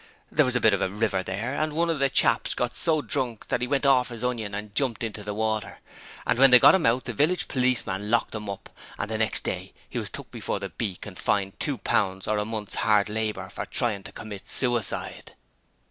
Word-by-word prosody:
There 150 - +4
was 125 - -1
a - - +3
bit 110 -3 +4
of 100 - 0
a - - +1
river 105 -1 0
there, 100 +8 -3
and 155 +1 -1
one 170 +2 +1
of 160 - -2
the 140 0 +3
chaps - - +2
got 120 -1 -2
so 155 -3 +3
drunk 120 -4 -3
that - - 0
he 125 - 0
went 140 +1 0
orf 130 -2 +4
his 120 -1 -7
onion 115 -5 -2
and 105 0 -6
jumped 125 -4 -1
into 110 -2 -4
the 105 0 -4
water, 110 -1 -2 0.5
and 125 - +1
when 135 0 +8
they 125 - +9
got - - +8
him 190 -8 +3
out 120 +2 +2
the 125 - -3
village 175 - +1
policeman 125 -6 0
locked 115 +1 +1
him 105 -2 -5
up, 100 - -7 0.3
and 105 +1 -4
the 110 - -1
next 110 -2 +1
day - - -4
he - - -4
was - - -4
took - - -9
before - - -3
the 100 -1 -5
beak 90 +3 -5
and 100 -3 -9
fined 95 -1 0
two 145 -3 -1
pounds 95 -4 0
or 105 -1 +1
a 105 - -1
month's 110 -2 -5
hard 105 -1 +3
labour 105 -3 -2
for - - -6
trying 115 -6 -1
to - - -10
commit 105 -3 -9
suicide. 120 -3 -1
110 Hz, 240 wpm, -26 LUFS, 105-125 Hz, 0.5 s, they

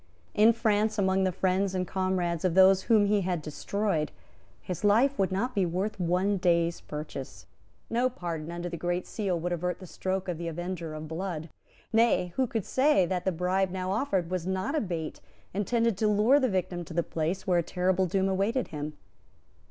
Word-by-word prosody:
In 215 +2 +6
France, 215 -1 +1
among 190 -1 +2
the 185 - +1
friends 190 +2 0
and 185 -1 -1
comrades 185 -3 -1
of 180 -2 +1
those 190 0 +7
whom 220 -3 +5
he 205 0 +2
had 180 -2 -1
destroyed, 155 +2 -2 0.5
his 180 +1 -6
life 240 +7 +4
would 195 -1 +2
not 230 +7 -1
be 200 - +2
worth 185 +4 -2
one 185 +3 +1
day's 170 -2 +1
purchase. 135 - -7 0.4
No 245 +2 +1
pardon 170 -7 -5
under 175 +1 -4
the 170 -1 -5
Great 175 +1 -1
Seal 190 -5 -2
would 175 +2 -3
avert 180 +1 -1
the 190 - -9
stroke 190 +2 -3
of 175 -3 -3
the 170 - -4
avenger 170 -1 -4
of 155 0 -6
blood. 165 -1 -4 0.4
Nay, 225 -6 +3
who 260 -1 +1
could 225 -4 -3
say 265 -8 +3
that 180 0 -2
the 190 - +2
bribe 180 +2 0
now 185 0 -3
offered 195 -6 0
was 180 -1 -2
not 190 +8 -1
a 310 - +1
bait 170 -6 -4 0.3
intended 230 +1 +1
to 215 - +2
lure 210 +7 +4
the 260 -3 +1
victim 180 -2 -2
to 160 - -9
the 170 - +2
place 165 +4 -2
where 180 -2 +3
a - - +3
terrible 185 +2 +1
doom 190 +2 +1
awaited 200 +7 0
him? 150 0 -5
185 Hz, 195 wpm, -28 LUFS, 175-205 Hz, 0.5 s, those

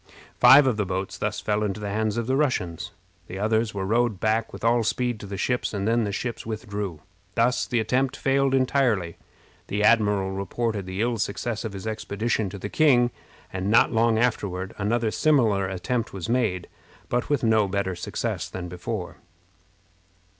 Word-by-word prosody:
Five 140 +1 +8
of 125 -5 +1
the 105 - 0
boats 95 +1 -3
thus 105 0 -2
fell 105 0 -1
into 105 -1 -2
the 105 -1 -4
hands 110 +1 -1
of 115 - -1
the 130 +2 +1
Russians. 90 - -1 0.4
The 95 - -7
others 110 +1 0
were 95 -1 -2
rowed 115 -1 +1
back 110 +2 0
with - - -10
all 115 0 +3
speed 120 0 -1
to 105 - -8
the 100 0 -5
ships, 125 +2 -1
and 100 0 -1
then 115 0 +2
the 100 - -2
ships 115 +3 -4
withdrew. 105 -7 -5 0.3
Thus 120 +2 +2
the 120 - +1
attempt 125 +4 0
failed 135 0 +2
entirely. 125 - +1 0.5
The 105 +1 -1
admiral 105 -4 +3
reported 100 +1 -3
the 95 +2 -3
ill 115 -1 0
success 110 +3 -2
of 110 -3 -5
his 95 0 -7
expedition 110 -1 -2
to 100 - -8
the 100 - -5
king, 120 -2 +4 0.4
and 95 +1 -2
not 115 - +5
long 115 0 +3
afterward 100 -6 -1
another 110 +2 0
similar 115 -12 +2
attempt 110 +6 -2
was 95 -3 -5
made, 115 -7 0 0.4
but 120 0 -1
with 145 -3 +1
no 110 -2 +3
better 95 -1 -1
success 85 - -3
than 90 -1 -6
before. 90 +2 -5
110 Hz, 180 wpm, -25 LUFS, 100-120 Hz, 0.5 s, Five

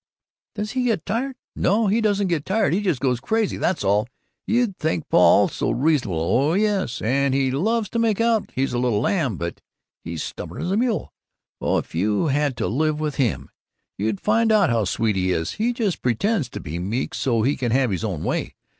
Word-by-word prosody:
"Does 210 0 -3
he 255 -1 -1
get 225 -9 0
tired? 250 +6 -2 0.2
No, 210 +5 +2
he 210 +3 +2
doesn't 205 -2 +1
get 165 -5 -1
tired, 190 -4 +1
he 195 - +1
just 180 -10 0
goes 125 -3 0
crazy, 220 - 0
that's 180 - 0
all! 100 +3 +2 0.4
You 235 -3 +2
think 160 0 -1
Paul 85 -1 +6
is - - -4
so - - -1
reasonable, 135 - +1
oh, 130 - +2
yes, 200 - 0
and 135 +4 +1
he 135 -1 +1
loves 215 - 0
to 230 - -2
make 225 -3 +1
out 230 -2 +2
he's 135 0 0
a 120 - 0
little 120 -4 +1
lamb, 140 - 0
but 85 0 -5 0.4
he's 80 -1 -4
stubborn - - -6
as 175 - -2
a - - +2
mule. 230 0 -1 0.5
Oh, - - +1
if - - -5
you 105 - +1
had 140 -2 0
to - - -1
live 155 +5 0
with 150 -2 -3
him! 125 -6 -1 0.4
You'd 105 0 -2
find 225 +1 +2
out 205 - +4
how 115 -3 +1
sweet 110 +2 0
he 95 -1 +1
is! 80 -2 -1
He 225 +3 0
just 225 -7 -2
pretends 135 - 0
to - - -7
be 85 +1 -5
meek 105 +9 -2
so 115 -4 0
he 140 +5 +2
can 120 -3 -2
have 130 -2 +2
his 95 +2 -2
own 95 -8 -3
way. - - -2
145 Hz, 215 wpm, -23 LUFS, -, 0.5 s, Paul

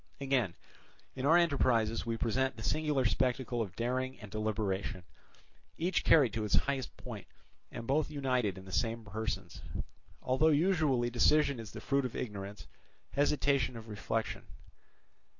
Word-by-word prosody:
Again, 135 -10 +1 0.6
in 135 +1 -1
our 165 +3 +7
enterprises 120 -10 +2
we 115 0 -1
present 130 +4 0
the 110 - -8
singular 150 -2 +1
spectacle 125 +3 +1
of 95 -4 -4
daring 130 +2 -2
and 105 -4 -10
deliberation, 105 -3 -2 0.7
each 175 +2 0
carried 135 -9 +5
to 110 - -1
its 105 - +2
highest 135 -2 -1
point, - - -8 0.4
and 115 - -6
both 145 +5 +1
united 125 -9 0
in 95 - -10
the 95 - -10
same 115 +2 -1
persons; 110 +1 -4 0.6
although 130 +5 +3
usually 150 -6 +3
decision 140 +2 +3
is 110 -2 -7
the - - -8
fruit 140 -1 +1
of 125 - -4
ignorance, 100 -3 -5 0.5
hesitation 140 -3 +2
of 110 0 -10
reflection. 110 +2 -3
125 Hz, 145 wpm, -32 LUFS, 110-140 Hz, 0.7 s, our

